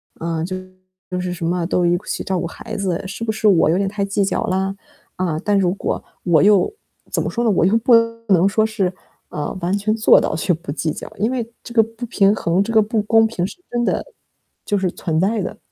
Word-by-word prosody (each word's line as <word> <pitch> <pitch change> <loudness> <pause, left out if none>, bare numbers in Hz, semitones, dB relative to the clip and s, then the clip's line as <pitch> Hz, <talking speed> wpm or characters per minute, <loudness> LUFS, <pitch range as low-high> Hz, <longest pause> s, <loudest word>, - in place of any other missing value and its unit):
啊， 165 -1 -3
就 185 +2 -3 0.5
都 180 0 -2
是 180 0 -3
什 170 -1 -5
么 175 0 0
都 180 -1 +1
一 175 0 +3
起 - - -3
照 190 -1 -1
顾 170 - -2
孩 220 +5 -8
子， 185 -4 -1
是 200 +4 -6
不 220 - 0
是 220 0 0
我 170 -5 +5
有 170 - +3
点 195 0 0
太 200 -1 -2
计 200 0 0
较 - - -1
了？ 190 +1 -1 0.4
啊， 170 -4 -1
但 205 -1 +2
如 180 -1 +2
果 - - -3 0.2
我 170 -2 +4
又 205 - +4 0.4
怎 - - 0
么 - - -2
说 240 - -2
呢， 225 - +3
我 175 - +3
又 195 - +3
不 235 +1 +5 0.3
能 185 0 +5
说 220 +2 +2
是， 200 -5 -1 0.4
呃， 150 +5 -4
完 175 +3 0
全 215 +2 0
做 220 - +6
到 - - -1
就 175 +3 +1
不 165 -3 -14
计 155 +2 -2
较。 - - -7
因 220 +4 0
为 235 -3 -3
这 235 - -9
个 225 - +6
不 225 +2 -8
平 200 -2 +3
衡、 170 +3 +1
这 230 - -4
个 220 - +6
不 215 +1 0
公 225 +1 +4
平 180 -5 -2
是 - - -11
真 240 -1 0
的 - - 0 0.6
就 205 - +1
是 185 -2 0
存 160 -3 -2
在 205 +3 +1
的。 210 +3 -5
195 Hz, 260 characters per minute, -20 LUFS, 175-220 Hz, 0.6 s, 做